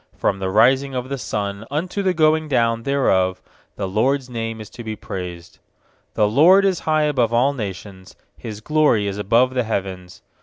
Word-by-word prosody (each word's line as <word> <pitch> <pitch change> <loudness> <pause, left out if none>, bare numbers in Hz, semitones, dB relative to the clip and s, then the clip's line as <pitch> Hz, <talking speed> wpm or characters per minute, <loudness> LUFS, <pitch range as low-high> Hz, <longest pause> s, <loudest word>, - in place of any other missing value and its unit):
3From 100 - 0
the 95 -1 -2
rising 130 +6 +3
of 125 +1 -4
the 140 - -3
sun 100 -2 -4
unto 175 +8 -2
the 185 -2 0
going 155 0 +2
down 115 -4 +1
thereof 95 -9 +1 0.4
The 100 - -3
LORD'S 125 +6 0
name 115 -1 -4
is 110 - -8
to 120 -1 -9
be 110 -1 -5
praised. 90 -4 -8 0.6
4The 105 0 +1
LORD 180 - +6
is 190 -3 +1
high 155 -1 +3
above 130 -6 +1
all 125 +4 +2
nations, 95 -5 -8 0.2
His 105 -2 -8
glory 150 -6 +2
is 100 0 -3
above 120 +5 +2
the 130 - +1
heavens. 95 -4 -5
115 Hz, 180 wpm, -21 LUFS, 100-140 Hz, 0.6 s, LORD